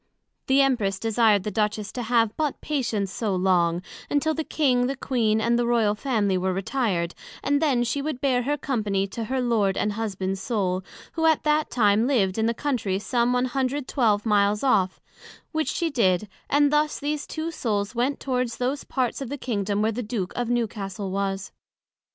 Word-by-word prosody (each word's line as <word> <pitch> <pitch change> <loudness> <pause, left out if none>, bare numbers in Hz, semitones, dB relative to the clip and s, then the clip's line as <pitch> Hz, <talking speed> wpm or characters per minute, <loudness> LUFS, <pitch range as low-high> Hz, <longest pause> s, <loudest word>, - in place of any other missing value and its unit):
The 270 +1 +5
Empress 220 -8 +1
desired 220 -2 +3
the 210 - -3
Duchess 210 0 -1
to 250 - -4
have 230 -2 +2
but 300 -3 -1
patience 230 -10 -1
so 210 -4 -1
long, 180 -2 +2 0.3
until 305 +2 +1
the 320 - -2
King, 255 -6 +2
the 275 - -2
Queen, 225 -5 +1
and 235 +2 +2
the 240 - +1
Royal 230 -3 +3
Family 210 -5 0
were 185 +1 0
retired, 190 -4 -1 0.3
and 285 +1 +2
then 270 -6 +2
she 245 +4 -1
would 295 -3 -3
bear 255 -3 +2
her 290 +4 -1
Company 210 -8 -1
to 225 +3 -4
her 260 +4 -1
Lord 220 -6 +1
and 210 - +1
Husband's 195 -3 -3
Soul, 190 -5 -1 0.3
who 325 -1 +1
at 320 -2 +3
that 300 0 +2
time 215 0 +3
lived 215 -7 +1
in 220 - +2
the 230 - 0
Country 235 -9 -1
some 235 +4 +1
112 255 -3 0
miles 210 0 +2
off; 195 -8 +2 0.5
which 315 -1 -1
she 340 -4 -1
did: 200 -6 +2 0.2
and 290 +1 +3
thus 300 0 +2
these 295 0 -3
two 320 +1 -4
souls 210 -7 -2
went 250 +4 0
towards 250 -3 -1
those 260 +3 -1
parts 255 0 -2
of 265 - -4
the 285 - -4
Kingdom 205 -5 -1
where 220 - +2
the 235 +3 -3
Duke 210 -5 -3
of 245 -1 -2
Newcastle 205 -5 -2
was. 195 0 -2
235 Hz, 185 wpm, -25 LUFS, 200-270 Hz, 0.5 s, The